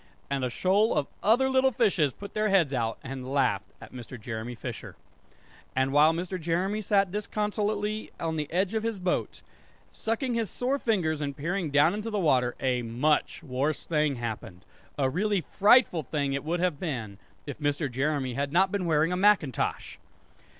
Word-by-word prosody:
And 135 -1 0
a 125 - 0
shoal 195 - +2
of 145 - +1 0.2
other 240 +5 +4
little 265 0 +3
fishes 200 - +2
put 200 +9 -10
their 215 0 +1
heads 175 -8 +3
out, 115 -3 -1
and 130 -1 -6
laughed 135 -3 +1
at - - -13
Mr. 125 0 -9
Jeremy 115 +2 -5
Fisher. - - -7 0.8
And 130 +1 +1
while 150 +2 +6
Mr. 180 +2 -4
Jeremy 180 +6 0
sat 195 -2 +2
disconsolately 210 +1 -2
on 160 -1 -2
the 150 -2 -3
edge 185 +4 0
of 220 - 0
his 225 -2 -3
boat 180 -1 -2 0.5
sucking 235 +3 -2
his 230 -4 -1
sore 265 +3 -1
fingers 165 - 0
and 140 -2 -3
peering 170 +3 -2
down 145 +4 +4
into 210 +2 -4
the 210 - -2
water 130 -9 +2
a 125 -2 0
much 125 +8 0
worse 140 +2 -1
thing 150 -3 +1
happened; 110 -6 -6 0.3
a 135 -2 +2
really 195 +7 0
frightful 205 - +4
thing 140 -1 -2
it 140 - -2
would 170 +3 -1
have 180 -6 0
been, 115 - -4 0.3
if 145 -1 -7
Mr. 145 0 0
Jeremy 135 0 -1
had 140 +3 -2
not 185 +4 +3
been 200 -3 -1
wearing 160 +1 +2
a - - 0
macintosh! 185 - +1
160 Hz, 180 wpm, -28 LUFS, 135-205 Hz, 0.8 s, while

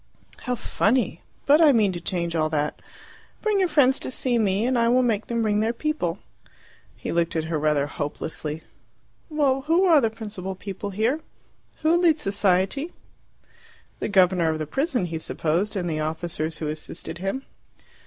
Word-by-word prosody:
"How 250 - 0
funny! 220 -5 0 0.2
But 295 +3 +6
I 310 -3 +7
mean 215 -6 +3
to 175 -2 -6
change 170 -1 -2
all 155 -1 +1
that. 150 -1 -2 0.6
Bring 425 -2 +2
your 375 - +3
friends 275 -5 +4
to - - -5
see 250 -1 0
me, 205 0 +1
and 255 +1 +1
I 230 -1 +3
will 255 +1 +4
make 220 -3 0
them 235 -1 0
bring 210 -1 +2
their 220 +2 +1
people." 240 - -2 0.8
He - - -5
looked 170 0 0
at 160 - 0
her 160 -1 -2
rather 150 -2 +2
hopelessly. 150 +2 -4 0.7
"Well, 280 -4 +1
who 340 +4 +4
are 325 -5 +6
the 225 - +2
principal 205 -4 -6
people 200 +2 -6
here? 220 +9 0 0.6
Who 320 +2 +4
leads 330 -3 +3
society?" 195 - +1 1.1
The - - -2
governor 180 -4 +4
of 160 - -1
the 155 - -3
prison, 270 - 0
he 165 -2 -4
supposed, 170 +6 -1
and 180 -3 -1
the 155 -2 -2
officers 160 0 -3
who 155 - -4
assisted 155 +2 -6
him. 195 +9 -3
200 Hz, 175 wpm, -24 LUFS, 165-260 Hz, 1.1 s, I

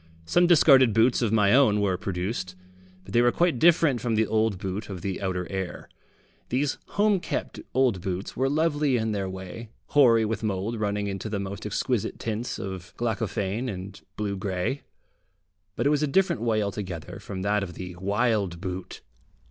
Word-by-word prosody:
Some 175 - +3
discarded 135 - +6
boots 115 +3 +4
of 115 -4 +1
my 105 -2 +4
own 125 -6 +5
were 100 -3 +1
produced, 90 +1 -3 0.5
but 95 - -11
they 120 - +5
were 120 0 +4
quite 170 -5 +1
different 160 -6 +4
from 115 -2 0
the 110 +1 +3
old 110 -2 +1
boot 95 +3 -5
of 95 -3 -6
the 95 -2 -3
outer 90 -2 -2
air. 95 -2 -4 0.6
These 135 +3 0 0.2
home 205 -1 +4
kept - - -4 0.2
old 125 -8 +2
boots 95 +1 -4
were 135 +1 +1
lovely 150 -3 +2
in 110 -1 -1
their 100 -2 -2
way, 95 +4 -8 0.2
hoary 115 -6 +5
with 110 -1 -2
mould 110 +2 -2
running 105 -1 -1
into 100 +1 -4
the 105 -2 -2
most 100 +1 -5
exquisite 110 +1 -1
tints 115 +2 -3
of 95 -2 -7
glaucophane 110 0 -2
and 95 0 -7 0.2
blue 105 -2 -2
grey, 95 +7 -2 0.9
but - - -1
it 145 - +4
was 150 -1 +2
a 150 - +2
different 180 - +2
way 110 -2 +1
altogether 95 -5 -5
from 95 -2 -6
that 105 +1 +1
of 90 -4 -5
the 90 -1 -7
wild 100 -2 0
boot. 90 0 -6
105 Hz, 180 wpm, -26 LUFS, 95-125 Hz, 0.9 s, discarded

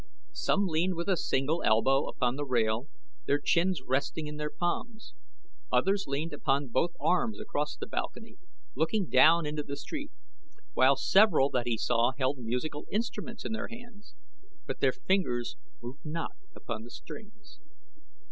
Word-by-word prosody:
Some 345 - +1
leaned 175 +1 +1
with 170 +2 -3
a 190 - +3
single 150 +1 0
elbow 135 +6 +3
upon 125 -1 0
the 145 - -3
rail, 120 -1 +1 0.4
their 145 - +4
chins 170 +1 +1
resting 140 +4 -1
in 150 0 -6
their 150 0 -2
palms; 220 - -3 0.6
others 195 +1 +2
leaned 145 +4 -2
upon 140 -1 0
both 165 +8 +1
arms 220 +5 +1
across 150 +1 -3
the - - -5
balcony, 225 - -5 0.4
looking 170 - +1
down 165 +1 +6
into 150 0 -2
the 140 -1 -6
street, 295 - -6 0.6
while 135 - +5
several 165 -2 +4
that 120 -1 0
he 115 -2 +1
saw 120 +4 +2
held 135 0 0
musical 125 +6 -3
instruments 230 +1 -3
in - - -3
their 220 - -3
hands, 235 - -13 0.5
but - - -5
their - - +4
fingers 180 - 0 0.3
moved 125 +4 -8
not 165 +2 -3 0.2
upon 115 -2 -5
the 120 - -10
strings. 220 - -11
150 Hz, 155 wpm, -30 LUFS, 130-200 Hz, 0.6 s, down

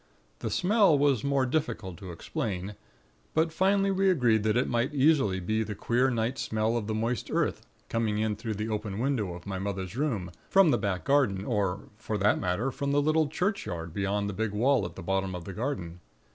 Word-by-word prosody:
The - - -3
smell 195 -4 +4
was 140 -4 +2
more 140 -1 +2
difficult 115 - -2
to 95 0 -8
explain; 95 +3 -4 0.6
but 160 0 +2
finally 195 +2 +2
we 195 0 +3
agreed 120 - +3
that 110 +2 +1
it 125 - +2
might 120 +5 0
easily 135 -9 +3
be 110 +5 -1
the 110 -1 -3
queer 125 +6 +1
night 120 +2 -1
smell 110 +1 0
of 110 -3 -2
the 110 - -1
moist 115 0 -2
earth, - - -1 0.2
coming 110 -2 0
in 110 0 0
through 110 +1 -4
the 105 +2 -3
open 105 -2 -3
window 115 -7 -1
of 90 - -11
my 95 -2 -4
mother's 95 0 -4
room, 115 - -1 0.2
from 195 -5 +6
the - - +2
back 100 -4 -2
garden, 125 -9 +2
or 100 -5 0 0.2
for 110 - -3
that 105 +1 +3
matter 95 +8 -1
from 140 +1 -2
the 145 - +4
little 155 +1 +2
churchyard 145 - -2
beyond 100 +1 -1
the 100 - -3
big 110 +1 -2
wall 120 +1 +2
at 85 - -7
the - - -8
bottom 95 +1 -1
of 85 -2 -7
the 95 - -6
garden. 95 -8 -4
110 Hz, 205 wpm, -28 LUFS, 100-140 Hz, 0.6 s, from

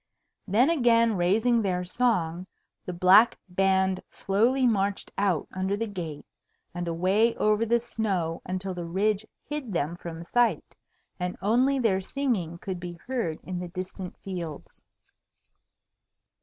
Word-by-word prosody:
Then 235 - +4
again 230 -6 +3
raising 220 +7 +2
their 180 -3 -1
song, 180 -5 0 0.4
the - - -2
black 185 +6 +6
band 190 0 +2
slowly 235 +7 +1
marched 200 -4 0
out 195 -6 0
under 190 +2 -1
the 230 - -1
gate 170 -8 -6 0.5
and 175 0 -4
away 190 +7 +2
over 215 +2 +2
the 235 +2 +4
snow 195 -8 -2
until 185 +1 -3
the 175 -1 -5
ridge 205 +4 0 0.2
hid 290 -7 -4
them 165 0 -1
from 170 -1 -7
sight, 240 +6 +1 0.4
and 180 0 -3
only 245 +8 +2
their 215 -7 +2
singing 195 - -2
could 185 0 -5
be 175 0 -6
heard 175 -3 -3
in 185 -1 -4
the 180 - -5
distant 185 +1 -7
fields. 170 -6 -7
190 Hz, 135 wpm, -27 LUFS, 180-230 Hz, 0.5 s, black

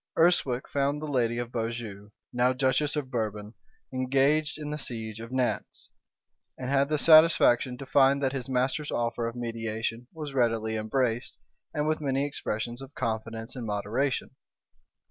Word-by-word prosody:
Urswic 160 -7 +3
found 140 +1 0
the 155 - -5
lady 120 -5 0
of 120 0 -4
Beaujeu, 115 -3 -4 0.2
now 125 +1 +3
duchess 135 +3 +1
of 140 -3 -3
Bourbon, 105 -2 -3 0.4
engaged 135 +4 +2
in 150 -1 -5
the 150 - -3
siege 110 -4 -5
of 115 +1 -7
Nantz, 130 -1 -2 0.7
and 130 0 -4
had 140 0 +3
the 155 - +1
satisfaction 155 -6 +6
to 135 - -8
find 135 0 +4
that 135 0 +1
his 135 -2 -4
master's 130 +4 0
offer 115 0 -1
of 115 - -5
mediation 115 0 -3
was 150 -4 -7
readily 115 -3 +1
embraced 115 +2 -1 0.3
and 150 0 -1
with 155 0 0
many 135 -1 0
expressions 120 -3 -4
of 135 +1 -11
confidence 115 0 -3
and 120 -3 -5
moderation. 110 +7 -1
125 Hz, 155 wpm, -28 LUFS, 115-140 Hz, 0.7 s, satisfaction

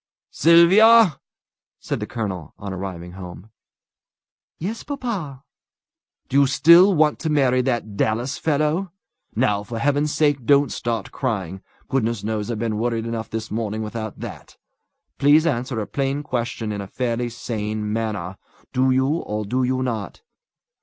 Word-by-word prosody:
"Sylvia!" 185 +2 +6 0.6
said - - -3
the - - -4
colonel, 95 - -5
on 100 -1 -6
arriving 90 -2 -6
home. 90 +3 -10 1.1
"Yes, 210 +7 -4
papa." 205 - -5 0.8
"Do 140 - +2
you 140 - +4
still 170 +7 +6
want 155 -1 +2
to 160 - -2
marry 130 -4 +3
that 120 -5 -2
Dallas 120 +7 -1
fellow? 155 +4 0 0.4
Now, 105 -3 +1
for 115 +3 -7
Heaven's 145 +4 +1
sake, 145 -4 +1
don't 140 +2 +4
start 115 -4 -3
crying! 95 -8 -3 0.3
Goodness 115 -5 -1
knows 110 0 -2
I've 115 - -2
been 110 -1 -2
worried 115 -1 -1
enough 115 -1 -4
this 110 0 -5
morning 110 0 -2
without 110 0 -6
that. - - -9 0.6
Please 150 +3 +5
answer 125 -4 -1
a 105 - -2
plain 140 +5 -2
question 120 -5 -3
in 100 -1 -4
a 100 - -7
fairly 120 +1 -2
sane 105 -2 -4
manner. 105 -5 -3 0.4
Do 130 +1 +2
you, 130 0 +3
or 110 -9 -2
do 125 +6 -1
you 130 +1 0
not?" 120 - -4
120 Hz, 145 wpm, -22 LUFS, 110-145 Hz, 1.1 s, Sylvia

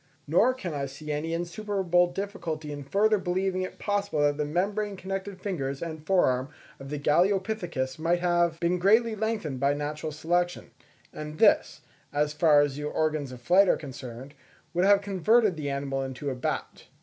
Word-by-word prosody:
Nor 220 - +4
can 185 -10 -5
I 140 -1 -2
see 145 +3 -7
any 150 +2 -2
insuperable 175 0 0
difficulty 170 -6 -4
in 145 -1 -6
further 210 +8 +2
believing 185 +1 -1
it 185 - -5
possible 205 -5 -1
that 145 0 +2
the 150 - 0
membrane 200 +6 -1
connected 195 0 -5
fingers 140 -9 -3
and 160 -2 -6
fore 190 -2 +4
arm 130 +1 0 0.3
of 135 0 -9
the 150 - -3
Galeopithecus 175 -3 0
might 170 +2 +2
have 175 -2 +1
been 175 +1 +1
greatly 220 +5 +4
lengthened 215 - -2
by 140 +2 +2
natural 150 +1 -4
selection; 175 +3 -1 0.4
and 150 0 -7
this, - - +3 0.3
as 150 +1 0
far 150 -1 +5
as 145 -1 -1
the 150 - -5
organs 155 -2 -1
of 125 -1 -10
flight 185 +6 +5
are - - +4
concerned, 130 -2 -9 0.4
would 175 +2 +2
have 200 0 +5
converted 200 +1 +2
the 150 -2 -4
animal 140 -1 -2
into 135 +1 -4
a - - -4
bat. 125 - -4
170 Hz, 175 wpm, -27 LUFS, 145-195 Hz, 0.4 s, far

